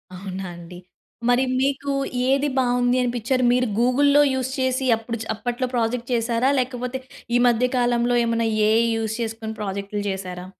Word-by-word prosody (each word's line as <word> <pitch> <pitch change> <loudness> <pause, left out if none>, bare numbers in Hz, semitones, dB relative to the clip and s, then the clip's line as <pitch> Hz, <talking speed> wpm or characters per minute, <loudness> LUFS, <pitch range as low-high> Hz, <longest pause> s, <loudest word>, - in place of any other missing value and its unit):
అవునా 190 0 -6
అండి? 175 +1 -11 0.5
మరి 245 +1 +4 0.2
మీకు 280 +1 0 0.4
ఏది 275 +2 +2
బావుంది 245 -1 +2
అనిపించారు 245 +1 0
మీరు 250 0 +2
గూగుల్‌లో 280 +4 +4
యూజ్ 260 0 -1
చేసి 260 +1 0
అప్పుడు 230 +1 -5 0.2
అప్పట్లో 245 +3 -3
ప్రాజెక్ట్ 235 +1 -1
చేసారా? 235 +2 +1
లేకపోతే 250 0 -3 0.4
ఈ - - +2
మధ్య 240 +1 +3
కాలంలో 240 0 +2
ఏమన్నా 230 0 0 0.2
ఏఐ 225 +2 +4
యూజ్ 220 -1 -2
చేసుకొని 225 -1 -4
ప్రాజెక్టులు 200 +1 -4
చేశారా? 185 -2 -5
240 Hz, 140 wpm, -23 LUFS, 225-255 Hz, 0.5 s, మరి